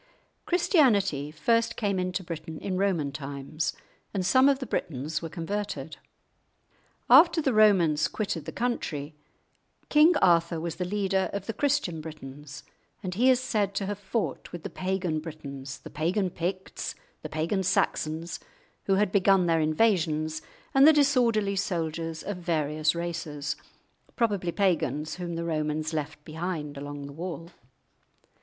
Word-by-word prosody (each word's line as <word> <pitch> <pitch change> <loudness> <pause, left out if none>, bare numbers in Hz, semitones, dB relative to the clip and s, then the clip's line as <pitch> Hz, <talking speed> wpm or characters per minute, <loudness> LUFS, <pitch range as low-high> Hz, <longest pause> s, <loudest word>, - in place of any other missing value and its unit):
Christianity 220 - +3
first 230 +9 +1
came 200 -3 0
into 185 +1 -2
Britain 160 -2 -6
in 190 +3 -3
Roman 185 -7 +1
times, 140 +3 -4 0.4
and 185 -2 0
some 260 +8 +5
of 275 - +3
the 265 - -5
Britons 155 - -3
were 165 - -5
converted. 200 +5 -4 1.1
After 325 +6 +7
the 275 -5 +1
Romans 175 -8 +4
quitted 195 -7 -3
the - - -5
country, 160 -12 -2 0.8
King 310 +3 +6
Arthur 170 - +3
was 165 0 -4
the 180 - -2
leader 195 0 0
of 200 -1 -3
the 225 - -3
Christian 250 - 0
Britons, 145 -2 -9 0.4
and 185 -1 -3
he 245 +7 +4
is 255 -1 +5
said 210 -6 -1
to 195 - -1
have 205 +1 -4
fought 205 +2 -3
with 175 -2 -7
the - - -5
pagan 185 -4 -1
Britons, 140 -4 -7
the - - -12
pagan 180 +4 0
Picts, 185 +3 -4 0.3
the - - -6
pagan 165 +6 -1
Saxons, 165 -2 0 0.5
who 195 - +3
had 205 -1 +2
begun 195 -2 +4
their 165 -1 +2
invasions, 155 -3 +1 0.3
and 270 +2 +7
the 315 - +8
disorderly 240 -9 +3
soldiers 165 -4 -2
of 205 -1 -4
various 155 -2 0
races, 165 -4 -3 0.6
probably 200 -7 0
pagans 160 -5 0
whom 175 -2 -4
the 170 0 -3
Romans 155 -1 -1
left 150 -1 -4
behind 160 -2 -4
along 145 0 -6
the 140 - -9
wall. 170 +1 -6
175 Hz, 145 wpm, -27 LUFS, 155-205 Hz, 1.1 s, the